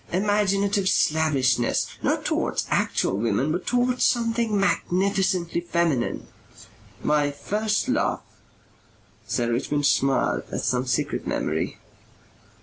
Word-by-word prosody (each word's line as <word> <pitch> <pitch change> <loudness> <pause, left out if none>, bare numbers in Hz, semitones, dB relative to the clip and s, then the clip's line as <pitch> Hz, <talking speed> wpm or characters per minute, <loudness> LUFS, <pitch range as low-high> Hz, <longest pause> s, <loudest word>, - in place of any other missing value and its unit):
imaginative 200 0 +1
slavishness 135 -6 +2 0.2
not - - 0
towards - - -1
actual 95 - 0
women 115 +6 0
but 175 +3 -3
towards 245 0 +1
something 230 -3 +1
magnificently 190 -3 0
feminine. 170 -7 -1 0.8
My 150 -1 +2
first 210 - -1
love 260 +3 0 0.6
" - - -33
Sir 120 -1 -1
Richmond 145 +4 -1
smiled 135 -1 +2
at - - -3
some 125 +1 0
secret 125 - -1
memory. - - -2
170 Hz, 105 wpm, -24 LUFS, 135-205 Hz, 0.8 s, slavishness